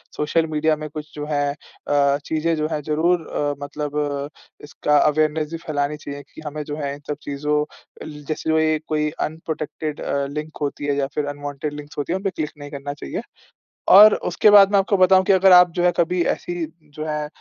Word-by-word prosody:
Social 160 +2 +1
media 155 0 +1
में 155 0 -6
कुछ 150 0 -8
जो 150 - -5
है 145 -1 0
अ, 140 -1 -1
चीज़ें 160 +1 0
जो 155 0 -1
हैं, 150 -1 -2
ज़रूर 160 +3 +1
अ, 145 -1 -1
मतलब 145 +1 -5 0.7
इसका 150 +1 +1
अवेयरनेस 155 +1 +2
भी 165 - -4
फैलानी 145 -1 -2
चाहिए 145 -1 -8
कि 155 - -11
हमें 150 +1 -4
जो 145 0 -5
है 140 -2 -3
इन - - -13
सब 150 -1 -3
चीज़ों 150 +1 -1 0.4
अल 155 - -8 0.2
जैसे 160 0 -3
जो 160 - +3
एक 155 0 +1
कोई 150 -1 0 0.2
अनप्रोटेक्टेड 155 -1 -5
अ, 140 0 -1
लिंक 150 +2 -6
होती 145 0 -3
है 145 -1 0
या 135 -1 0
फिर 150 - 0
अनवांटेड 145 +1 -5
लिंक्स 145 0 -10
होती 145 +4 -2
हैं, - - 0
उन 195 - -9
पे 195 - +1
क्लिक 155 -4 -4
नहीं 145 0 -9
करना 145 0 -5
चाहिए। 70 - -4 0.8
और 210 +1 +10 0.2
उसके 210 - +4
बाद 205 -1 +7
मैं 200 - +5
आपको 195 +1 +2
बताऊँ 185 0 +5
कि 195 - +3
अगर 190 0 +5
आप 180 -1 +8
जो - - +2
है 175 - +4
कभी 175 +1 +1
ऐसी 175 -1 -4 0.3
जो 155 - -5
है 150 -1 -2
150 Hz, 215 wpm, -22 LUFS, 145-165 Hz, 0.8 s, और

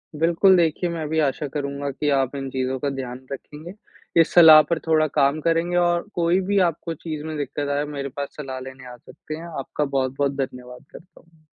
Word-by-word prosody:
बिल्कुल, 170 +5 +4
देखिये 170 +1 +1
मैं 160 -2 -4
भी 160 - 0
आशा 145 0 0
करूँगा 140 -1 -3
कि 145 +2 -2
आप 135 +1 -2
इन 135 -1 -4
चीज़ों 130 0 -2
का 145 - -1
ध्यान 130 -1 -6
रखेंगे। 150 +5 -8 0.5
इस - - 0
सलाह 160 -3 +9
पर 170 -2 0
थोड़ा 155 -1 +3
काम 140 +1 +1
करेंगे 165 +2 0
और 175 +2 +1
कोई 175 +1 +2
भी 205 - +2
आपको 165 +1 -6
चीज़ 155 -1 -6
में 155 0 -5
दिक्कत 145 +1 -3
आये, 145 +1 0
मेरे 140 -2 -5
पास 140 +2 -5
सलाह 135 -3 -6
लेने 130 0 -10
आ - - -10
सकते 155 +5 -10
हैं। 165 +2 -9
आपका 145 +2 -3
बहुत-बहुत 135 +1 -1
धन्यवाद 125 0 -6
करता 180 +1 -15
हूँ। 165 -2 -29
150 Hz, 200 wpm, -23 LUFS, 135-165 Hz, 0.5 s, सलाह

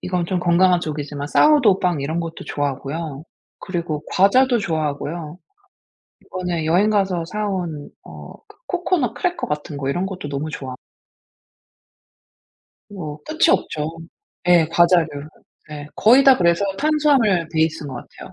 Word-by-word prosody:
이건 180 -2 -2
좀 180 0 -1
건강한 180 0 +3
쪽이지만 145 -2 -5
사워도우 250 - +4
빵 175 -5 0
이런 155 +5 -2
것도 165 -1 -7
좋아하고요. 145 +1 -4 0.4
그리고 170 -5 -4
과자도 245 +6 +4
좋아하고요. 155 -1 -3 0.9
이번에 180 -3 -3
여행 180 +7 +3
가서 190 -5 0
사 210 +4 -3
온 170 -7 -4 0.2
어 - - -11
그 - - -19
코코넛 350 - -1
크래커 355 -1 -2
같은 150 0 -4
거 135 -1 -3
이런 175 +7 -1
것도 185 -6 -6
너무 145 +2 -4
좋아 130 -4 -6 2.1
뭐 160 -8 -7
끝이 320 +3 +1
없죠. 150 - 0 0.6
네 175 -2 +5
과자류. 170 0 +4 0.6
네. 150 -1 -8
거의 250 +5 +6
다 270 -1 +7
그래서 170 +1 +2
탄수화물 280 - +2
베이스인 160 -1 0
것 130 - -7
같아요. 120 - -11
170 Hz, 300 characters per minute, -21 LUFS, 150-200 Hz, 2.1 s, 다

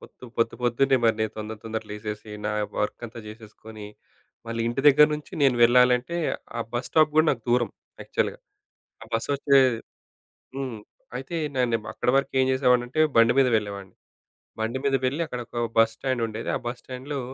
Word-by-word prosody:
పొద్దు - - -15
పొద్దు 115 0 +1
పొద్దున్నే 130 +3 +3
మరి 115 -1 +3
నేను 110 -1 -1
తొందర 110 0 -5
తొందర 110 0 -4
లేసేసి 105 0 -6 0.2
నా 105 - -1 0.3
వర్క్ 105 - -2
అంతా 115 +1 -11
జేసేసుకొని. 110 0 -11 0.6
మళ్ళీ 115 0 -3
ఇంటి 120 +3 -2
దగ్గర 150 +1 +7
నుంచి 150 0 -9
నేను 135 -3 +4
వెళ్ళాలంటే 125 +5 +4 0.4
ఆ - - -1
బస్ 120 +1 -2
స్టాప్ 155 -1 +4
కూడా 155 +1 +5
నాకు 120 -4 -3
దూరం. 120 -1 +2 0.3
యాక్చువల్‌గా. - - -2 0.8
బస్ 115 +3 -1
వచ్చే 140 0 +4 1.0
హ్మ్. 130 -5 -4 0.4
అయితే 135 +6 -6 0.2
నేనేమో 115 -4 0
అక్కడ - - -1
వరకు 140 - -1
ఏం 130 - +4
జేసేవాడినంటే? 125 +1 +2
బండి 115 +1 +6
మీద 135 - +5
వెళ్ళేవాడిని. 100 -2 -4 0.7
బండి 115 +4 -1
మీద 140 - +2
వెళ్లి 140 +6 -1
అక్కడ 125 -5 -5
ఒక 120 -1 -4 0.2
బస్ 115 0 +5
స్టాండ్ 130 -3 -2
ఉండేది. 110 0 -6
ఆ - - -1
బస్ 120 +1 -4
స్టాండ్‌లో 135 +2 -6
120 Hz, 165 wpm, -25 LUFS, 110-130 Hz, 1.0 s, దగ్గర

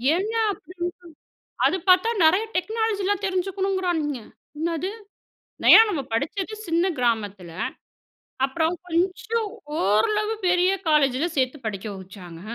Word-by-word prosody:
ஏயா, 440 +5 -1
அப்படினு 360 -3 -6 0.6
சொ - - -
அது - - +2
பாத்தா, 370 +4 +6 0.2
நெறய 370 +7 +4
டெக்னாலஜி 440 +2 -1
லா 410 - +3
தெரிஞ்சுக்கணுங்கிறானுங்க. 375 -6 -1 0.4
என்னது? 335 +3 -2 0.7
நயா, - - +9
நம்ம 355 -8 -1
படுச்சது 380 - -2
சின்ன 340 +2 +2
கிராமத்தில. 205 -7 -1 0.9
அப்புறம் 320 +5 0
கொஞ்சம் 380 +6 -1 0.3
ஓரளவு 420 - +2
பெரிய 360 +1 +3 0.2
காலேஜில 290 -1 +3
சேத்து 260 +2 0
படிக்க 205 -1 -4
வச்சாங்க. 185 -3 -11
350 Hz, 110 wpm, -24 LUFS, 260-390 Hz, 0.9 s, நயா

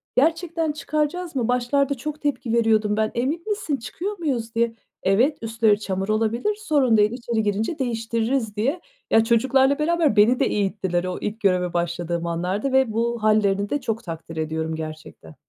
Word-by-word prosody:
Gerçekten 330 +2 +1
çıkaracak 305 +2 -2
mıyız? 240 -3 0
Başlarda 255 +3 +1
çok 300 +4 -6
tepki 255 -5 -1
veriyordum 220 -2 +2
ben. 215 0 +1
Emin 285 +8 -1
misin, 365 -9 -1
çıkıyor 365 - -5
muyuz 235 -8 -2
diye. 230 0 +1 0.3
Evet, 235 +11 +3
üstleri 220 -2 +2
çamur 195 0 -3
olabilir, 225 - 0
sorun 285 - +2
değil, 210 +1 +4
içeri 235 -2 -2
girince 215 - -1
değiştiririz 230 -1 -1
diye. 275 +12 -1 0.3
Ya, 225 - +6
çocuklarla 265 +5 +3
beraber 320 -4 +2
beni 220 +4 +5
de - - +3
eğittiler 190 -3 -1
o 185 0 -3
ilk 210 +2 -4
göreve 180 -3 +1
başladığım 170 0 -2
anlarda 180 +9 -1
ve 265 -4 +3
bu 235 0 -1
hâllerini 205 -2 +2
de 290 -1 -1
çok 225 -1 -3
takdir 165 -2 -7
ediyorum 160 0 -2
gerçekten. 155 - -9
230 Hz, 165 wpm, -23 LUFS, 205-275 Hz, 0.3 s, Ya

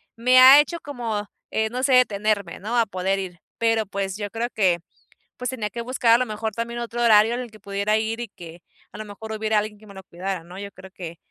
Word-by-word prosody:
me 250 +2 +5
ha 265 +3 +10
hecho 320 +3 +1
como, 230 -7 -4 0.2
eh, 220 0 0
no 250 +3 -4
sé, 265 - +3
detenerme, 210 -5 +2
¿no?, 220 +5 -2
a 230 - +4
poder 190 +1 -1
ir, 180 -3 -7 0.2
pero 225 -1 +1
pues 195 -1 -3
yo 205 -1 -4
creo 230 +1 -2
que, 185 -5 +2 0.6
pues 250 -1 -3
tenía 225 -5 -3
que 235 - -5
buscar 240 -1 +2
a - - +5
lo 255 - +1
mejor 220 0 -4
también 235 +2 -4
otro 240 0 -4
horario 220 0 +5
en 245 - -2
el 245 - -7
que 215 - -15
pudiera 200 +2 0
ir 220 +1 -2
y 240 - -4
que 170 0 -12 0.3
a - - -10
lo 215 - -5
mejor 215 +2 -9
hubiera 220 0 0
alguien 210 0 -2
que 215 - -17
me 200 - -13
lo 190 - -10
cuidara, 185 0 -5
¿no? 180 +3 -11
Yo 200 0 -7
creo 190 -1 -14
que, 170 -3 -8
215 Hz, 250 wpm, -23 LUFS, 200-235 Hz, 0.6 s, ha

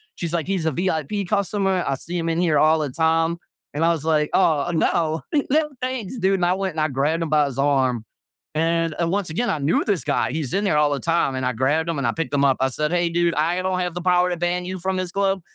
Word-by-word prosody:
She's 170 -1 -4
like, 170 -1 -1
"He's 190 -4 -1
a 160 - +2
VIP 180 +4 -1
customer. 195 -2 0
I 135 - 0
see 175 +6 -6
him 165 -1 -1
in 165 0 0
here 165 -4 +2
all 155 +1 +4
the 150 -2 -2
time." 165 +3 +1 0.4
And 155 +3 -1
I 170 - +4
was, 160 -3 -3
like, 155 -2 +2
"Oh, 165 -2 +2
no. 160 0 0 0.3
No 300 +1 +2
thanks, 255 -3 -4
dude." 195 0 +2
And 180 -2 0
I 180 - +3
went 190 -2 -2
and - - -2
I 155 - +2
grabbed 145 +5 0
him 160 - -4
by 150 -1 +3
his 135 0 -6
arm. 130 -5 +1 0.5
And, 165 0 0
uh, 170 - +1
once 195 0 -1
again, 235 +10 -1
I 155 - -1
knew 145 +4 +1
this 200 -6 0
guy. - - 0
He's 150 -5 -3
in 200 - +1
there 190 -7 +2
all 150 -1 +3
the 140 - -1
time, 165 -5 +1
and 130 0 -2
I 125 - +1
grabbed 145 +7 0
him, 165 - -1
and 120 - 0
I - - +2
picked 165 -3 -4
him 140 0 +3
up. 135 -1 +3
I 130 - +2
said, 150 +4 -2
"Hey, 175 -1 +1
dude, 170 0 +1
I 170 +4 +1
don't 185 0 -1
have 180 -1 -2
the 175 - -5
power 180 0 +3
to 175 - -2
ban 175 +1 -1
you 185 +1 -5
from 190 +2 -2
this 185 -1 -3
club." 195 -1 0
165 Hz, 275 wpm, -22 LUFS, 150-180 Hz, 0.5 s, all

